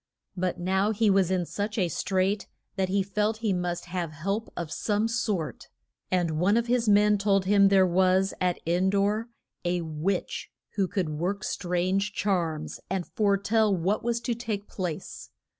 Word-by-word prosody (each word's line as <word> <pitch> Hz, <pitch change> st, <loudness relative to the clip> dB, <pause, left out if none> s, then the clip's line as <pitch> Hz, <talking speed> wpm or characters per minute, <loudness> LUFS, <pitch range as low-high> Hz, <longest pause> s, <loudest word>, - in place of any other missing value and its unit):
But 180 Hz, -1 st, -2 dB
now 190 Hz, +3 st, +1 dB
he 220 Hz, -1 st, +2 dB
was 190 Hz, -2 st, +3 dB
in 185 Hz, -2 st, +1 dB
such 210 Hz, +5 st, -3 dB
a 185 Hz, -4 st, +2 dB
strait 190 Hz, +4 st, 0 dB, 0.3 s
that 190 Hz, -2 st, 0 dB
he 195 Hz, +1 st, +2 dB
felt 210 Hz, +3 st, 0 dB
he 205 Hz, -, +3 dB
must 175 Hz, -1 st, -2 dB
have 175 Hz, -3 st, -4 dB
help 195 Hz, +8 st, -3 dB
of 170 Hz, -3 st, -4 dB
some 210 Hz, +1 st, 0 dB
sort. 215 Hz, -8 st, -2 dB, 0.4 s
And 170 Hz, -4 st, 0 dB
one 200 Hz, +6 st, +3 dB
of 235 Hz, -, +1 dB
his 240 Hz, -2 st, +1 dB
men 210 Hz, 0 st, +5 dB
told 195 Hz, -1 st, +2 dB
him 200 Hz, 0 st, +5 dB
there 195 Hz, -1 st, +5 dB
was 185 Hz, +2 st, +3 dB
at 180 Hz, -1 st, +1 dB
En 175 Hz, +3 st, +2 dB
dor 205 Hz, +4 st, +1 dB, 0.3 s
a 175 Hz, 0 st, 0 dB
witch 165 Hz, +4 st, -2 dB, 0.2 s
who 195 Hz, -3 st, +1 dB
could 180 Hz, -3 st, -1 dB
work 180 Hz, +6 st, -2 dB
strange 185 Hz, +3 st, -1 dB
charms, 170 Hz, -7 st, -1 dB
and 185 Hz, -2 st, -1 dB
fore 200 Hz, -2 st, +1 dB
tell 210 Hz, 0 st, +2 dB
what 190 Hz, +5 st, 0 dB
was 235 Hz, 0 st, 0 dB
to 240 Hz, -, -1 dB
take 220 Hz, -3 st, -4 dB
place. 175 Hz, -5 st, -5 dB
195 Hz, 175 wpm, -27 LUFS, 180-210 Hz, 0.4 s, men